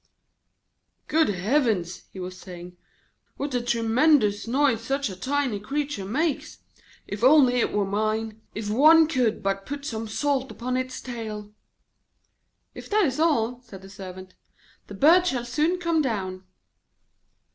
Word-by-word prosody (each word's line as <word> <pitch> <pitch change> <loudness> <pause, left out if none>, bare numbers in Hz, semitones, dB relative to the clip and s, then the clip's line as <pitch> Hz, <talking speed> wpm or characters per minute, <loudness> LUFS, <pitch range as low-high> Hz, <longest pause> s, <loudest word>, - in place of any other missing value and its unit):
'Good 320 0 +2
heavens!' 205 - 0
he 190 - -10
was 185 0 -6
saying, 180 -1 -10 0.6
'what 280 0 -4
a 245 - +1
tremendous 235 -1 +2
noise 260 -2 +2
such 270 -2 -1
a - - -7
tiny 260 +1 -1
creature 275 -1 -3
makes. 290 - -2 0.5
If 205 +2 -6
only 260 -2 +6
it - - +1
were 205 -1 0
mine! 215 +2 -2
If 215 -1 -4
one 310 +9 +6
could 245 -8 0
but 195 0 -2
put 285 0 -5
some 225 -5 -4
salt 270 +3 -1
upon 250 +1 -4
its 255 0 -3
tail!' 215 -4 -7 1.2
'If - - -10
that 420 -1 +3
is 270 0 -2
all,' 250 -7 +1
said 200 -6 -13
the 195 - -12
Servant, 185 -2 -10 0.5
'the 200 - -9
bird 340 - +5
shall 245 -6 -1
soon 300 +9 0
come 335 -3 +1
down.' 190 -8 -3
235 Hz, 145 wpm, -25 LUFS, 205-285 Hz, 1.2 s, only